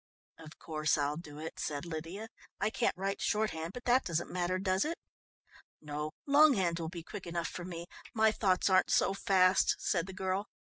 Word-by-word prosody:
"Of 155 -1 -12
course 155 -2 0
I'll 145 0 0
do 150 -2 -9
it," 160 +1 -7
said 145 +2 -3
Lydia. 170 +7 -6 0.3
"I 210 +2 +1
can't 230 - 0
write 195 +1 -2
shorthand, 190 -6 -1
but 245 - -8
that 250 +2 +4
doesn't 170 -1 -2
matter, 180 0 0
does 190 0 +1
it?" 330 +2 -2 0.8
"No, 150 0 -4 0.2
longhand 270 - +5
will 165 -1 -3
be 170 -1 -7
quick 195 +1 -8
enough 170 0 -2
for 175 - -6
me. 170 -2 -6 0.3
My 220 -1 +4
thoughts 190 -4 +2
aren't 185 -1 +4
so 195 - +3
fast," 190 -1 +4
said 175 -1 0
the 190 - -7
girl. 190 +1 -2
185 Hz, 185 wpm, -32 LUFS, 165-200 Hz, 0.8 s, longhand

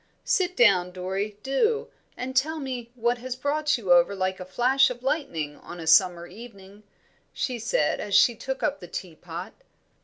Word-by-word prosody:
"Sit 365 -1 +1
down, 190 -7 +4
Dorrie, 190 +3 -4
do, 435 - +1 0.3
and 260 +1 -5
tell 310 +5 +1
me 255 -5 -5
what 240 0 0
has 255 +1 -5
brought 295 +2 0
you 190 -7 +3
over 175 +3 +4
like 185 0 -2
a 185 - -6
flash 255 +8 +3
of 245 0 -7
lightning 165 - -2
on 175 - -10
a 165 - -6
summer 175 0 +4
evening," 205 -1 -13 0.5
she 250 -3 -3
said, 215 -9 0
as 205 -2 -2
she 220 +4 +6
took 265 +4 -5
up 290 -1 0
the 175 - -10
tea 175 0 -6
pot. 170 +2 -8
230 Hz, 180 wpm, -26 LUFS, 185-265 Hz, 0.5 s, she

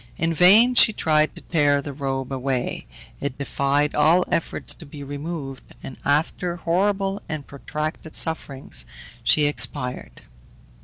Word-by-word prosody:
In 165 +1 0
vain 205 +9 +6
she 225 -2 +6
tried 155 -4 +1
to - - -10
tear 145 -4 +2
the 140 0 -6
robe 135 -1 -3
away; 130 -1 -2 0.3
it 140 -2 -4
defied 140 +1 0
all 160 +5 +4
efforts - - -1
to - - -13
be 145 0 -9
removed, 145 -1 -6 0.2
and 130 - -8
after 160 +4 0
horrible 195 +4 0
and 150 -3 -4
protracted 155 +3 -6
sufferings, 135 - 0 0.4
she 150 - +4
expired. 125 - -1
150 Hz, 135 wpm, -23 LUFS, 140-165 Hz, 0.4 s, vain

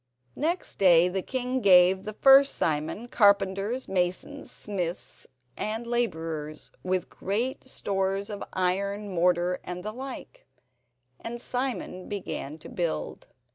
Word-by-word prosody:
Next 340 +5 -2
day 180 -2 +6
the 190 +1 -2
king 255 +3 -2
gave 185 -1 +6
the 215 - -4
first 275 +4 +6
Simon 155 +9 -1
carpenters, 200 +2 +2
masons, 185 +10 -2
smiths 180 -4 -5 0.3
and 220 +2 -3
labourers, 160 -10 -3
with 185 0 -1
great 230 +9 -3
stores 195 -1 -2
of 205 - -5
iron, 200 +2 -1
mortar, 180 +1 +2
and 180 0 -6
the 215 - -3
like, 260 - -9 0.7
and 235 +1 -6
Simon 245 -7 -3
began 180 -7 -5
to 155 - -12
build. 170 -3 -3
195 Hz, 120 wpm, -27 LUFS, 180-235 Hz, 0.7 s, day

